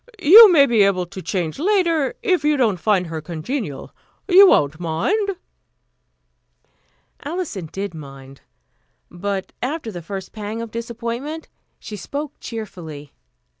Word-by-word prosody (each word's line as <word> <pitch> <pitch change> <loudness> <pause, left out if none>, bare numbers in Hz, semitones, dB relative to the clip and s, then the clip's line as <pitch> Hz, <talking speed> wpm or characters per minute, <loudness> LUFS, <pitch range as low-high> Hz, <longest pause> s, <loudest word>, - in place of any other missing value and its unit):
You 400 +4 +9
may 290 -5 +6
be 235 -5 +2
able 195 -2 +2
to 190 +2 -9
change 175 - -3
later, 335 -6 +1
if 365 -8 +1
you 300 0 +2
don't 220 -8 +1
find 195 -3 +1
her 160 -1 -6
congenial. 165 - -5 0.3
You 390 +1 +8
won't 150 - +2
mind?" 380 - -1 1.9
Alison 290 - -5
did 195 -1 -5
mind; 135 -3 -12 0.7
but 190 +2 -4
after 260 -2 -3
the 175 -3 -7
first 190 +2 -7
pang 215 +1 -6
of 230 -1 -6
disappointment, 235 +7 -5 0.3
she 210 - -9
spoke 280 +9 -6
cheerfully. 165 - -8
215 Hz, 130 wpm, -20 LUFS, -, 1.9 s, You